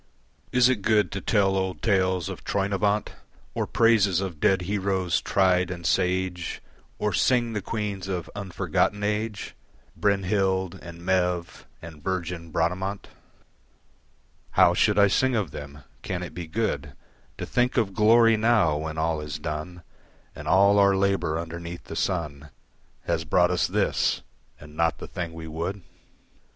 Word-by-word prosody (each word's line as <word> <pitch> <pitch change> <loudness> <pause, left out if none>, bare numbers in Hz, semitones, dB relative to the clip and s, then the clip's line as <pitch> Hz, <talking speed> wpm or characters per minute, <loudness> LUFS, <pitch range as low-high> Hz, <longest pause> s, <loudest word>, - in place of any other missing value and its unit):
Is 125 -1 +5
it 130 -5 +1
good 105 0 +2
to 100 - -4
tell 100 -3 +2
old 95 -1 -2
tales 95 -5 +1
of - - -7
Troynovant 100 +1 0 0.4
Or - - -2
praises 105 -6 +3
of 95 -5 -4
dead 95 +1 +2
heroes, 95 -2 0
tried 90 -2 +2
and 85 -2 -6
sage, 90 0 0 0.4
Or 105 -2 -1
sing 120 0 +2
the 105 - -2
queens 100 -2 -4
of 90 -3 -3
unforgotten 100 +1 -1
age, 105 0 -2 0.4
Brynhild 95 -2 +1
and 85 0 -11
Maeve 90 -2 -1 0.2
and 80 -3 -11
virgin 90 -2 -3
Bradamant? 90 +5 -2 1.4
How - - +5
should - - +2
I 100 - +7
sing 130 +6 +2
of 100 - -1
them? 70 0 -9 0.2
Can 90 -1 -4
it 85 - -8
be 85 -2 -6
good 110 +7 -2 0.4
To - - -4
think 125 +1 0
of 105 -5 +1
glory 115 +2 +5
now, 110 -9 +3
when 80 +1 -5
all 80 -1 0
is 75 0 -5
done, 80 +3 -6 0.5
And - - -8
all 100 +2 +5
our 100 -1 +5
labour 95 -5 +1
underneath 85 +1 -6
the - - -8
sun 75 -5 -2 0.6
Has 85 -1 0
brought 90 +3 +3
us 90 -3 +1
this - - 0 0.4
and 75 +1 -13
not 80 0 +1
the - - -8
thing 85 -2 -5
we 80 0 -8
would? 85 +5 -4
95 Hz, 150 wpm, -25 LUFS, 85-100 Hz, 1.4 s, I